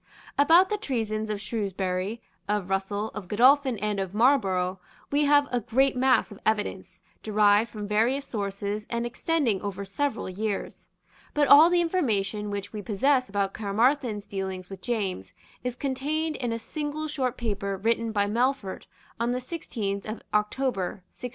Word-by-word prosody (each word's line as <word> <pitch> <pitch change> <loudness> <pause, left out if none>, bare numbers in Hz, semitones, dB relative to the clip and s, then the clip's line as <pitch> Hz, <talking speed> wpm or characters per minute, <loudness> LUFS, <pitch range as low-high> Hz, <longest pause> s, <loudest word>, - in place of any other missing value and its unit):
About 330 +6 +6
the 420 -1 -1
treasons 220 - -2
of 210 -1 -2
Shrewsbury, 200 -1 -3 0.3
of 205 -3 -1
Russell, 200 +2 -1
of 210 -4 -8
Godolphin 255 +4 +4
and 210 0 -1
of 190 0 -4
Marlborough, 190 -7 +2 0.3
we 290 +1 +3
have 290 0 +5
a 245 - +1
great 260 +5 +2
mass 255 -2 +3
of 205 - -10
evidence, 215 -1 -2 0.2
derived 210 +1 +3
from 210 -1 -6
various 235 +7 +1
sources, 205 -1 -3
and 235 0 -1
extending 240 - 0
over 200 -1 -4
several 280 +9 -2
years. 200 +2 -4 0.5
But 295 -1 +3
all 305 +4 +9
the 350 0 +3
information 215 - 0
which 205 0 -5
we 210 - -4
possess 255 +5 +1
about 200 -1 -1
Caermarthen's 220 +1 +1
dealings 190 -1 -5
with 190 -1 -8
James 195 - -3 0.3
is 250 -1 -2
contained 295 +4 -2
in 245 -3 -2
a 230 - -1
single 300 +5 -4
short 260 -4 -2
paper 200 -4 -2
written 230 +3 0
by 205 -2 +2
Melfort 235 -1 -1 0.3
on 235 +1 +1
the 250 - -1
sixteenth 220 - -4
of 215 +1 -6
October 210 -3 -1
1693. 250 - -6
220 Hz, 155 wpm, -27 LUFS, 200-265 Hz, 0.5 s, all